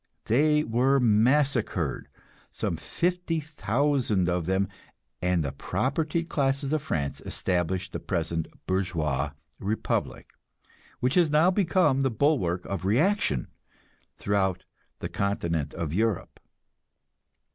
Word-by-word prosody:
They 150 +6 +3
were 130 +3 +2
massacred, 120 - +2 0.4
some - - -2
50,000 145 - 0
of 90 -2 -1
them, 95 +1 +1 0.5
and 90 -2 +1
the 70 - -2
propertied 155 - -1
classes 140 -1 0
of 155 - +1
France 70 - -2
established 90 +1 -1
the - - -3
present 80 -3 -2 0.2
bourgeois 80 -7 -1 0.3
republic, 105 +3 -2 0.7
which 125 +2 +2
has 175 -3 +4
now 155 +5 +4
become 180 -7 +2
the 135 - +2
bulwark 110 - +1
of 100 -1 -4
reaction 115 - +1 0.7
throughout 95 -3 0 0.4
the - - -2
Continent 85 -7 -1
of 80 -3 -3
Europe. 110 0 -1
110 Hz, 105 wpm, -27 LUFS, 90-150 Hz, 0.7 s, has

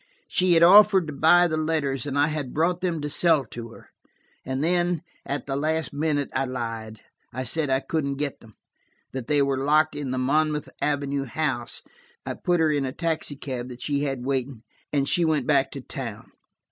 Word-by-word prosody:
She 180 -1 +3
had 165 0 +5
offered 195 0 +7
to 150 - -6
buy 170 +5 +5
the 155 -2 -2
letters, 150 -4 -1
and 140 0 -2
I 145 - +5
had 150 -5 -4
brought 170 +3 +1
them 170 -4 -1
to 150 - -2
sell 155 -2 +3
to 115 +1 -8
her. 115 - -15 0.5
And 130 +2 -2
then, 175 0 +1 0.2
at 140 +1 -3
the 135 - -3
last 155 +2 -1
minute, 145 -1 -1
I 135 - 0
lied. 115 -4 -5 0.3
I 130 +2 -4
said 145 +4 0
I 130 0 +2
couldn't 140 -3 -2
get 140 0 -3
them–that 115 +3 -13
they 145 -1 +3
were 135 -1 -1
locked 155 +2 +3
in 145 -3 -4
the 130 - -2
Monmouth 150 +3 +1
Avenue 140 -1 -1
house. 130 -3 -3 0.4
I - - -3
put 175 -1 0
her 160 -1 +3
in 145 -2 0
a 130 - -2
taxicab 140 -5 -3
that 125 0 -9
she 145 -1 0
had 135 -3 -3
waiting, 130 -3 -2 0.3
and 140 -2 +1
she 175 - +2
went 155 -5 +1
back 140 -2 +3
to 140 - -6
town. 115 -5 -7
145 Hz, 195 wpm, -25 LUFS, 130-160 Hz, 0.5 s, offered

